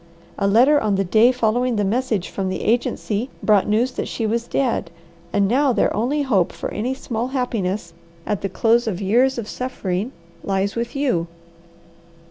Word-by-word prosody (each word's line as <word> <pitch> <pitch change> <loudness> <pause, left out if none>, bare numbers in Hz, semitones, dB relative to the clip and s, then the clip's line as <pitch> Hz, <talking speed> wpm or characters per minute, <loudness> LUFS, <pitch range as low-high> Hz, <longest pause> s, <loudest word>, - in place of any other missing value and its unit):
A 200 - +2
letter 255 +9 +5
on 210 -2 +1
the 195 - +1
day 220 +6 +4
following 245 0 +1
the 210 - +1
message 215 -2 -1
from 190 -1 -3
the 185 - -3
agency 230 0 0
brought 210 -3 +4
news 225 +5 +2
that - - -4
she 225 - -3
was 230 +2 -1
dead, 260 -4 0 0.4
and 200 -1 +2
now 265 +5 +3
their - - +1
only 275 +7 0
hope 200 -10 +2
for - - -6
any 250 +5 -2
small 240 -2 -3
happiness 210 -9 -2 0.3
at 210 -2 -2
the 195 - -2
close 230 +5 +2
of 190 -5 -2
years 245 +7 +2
of 230 -3 -4
suffering 215 -3 -3 0.3
lies 195 +1 -1
with 235 +2 -3
you. 250 -12 0
225 Hz, 175 wpm, -21 LUFS, 200-250 Hz, 0.4 s, letter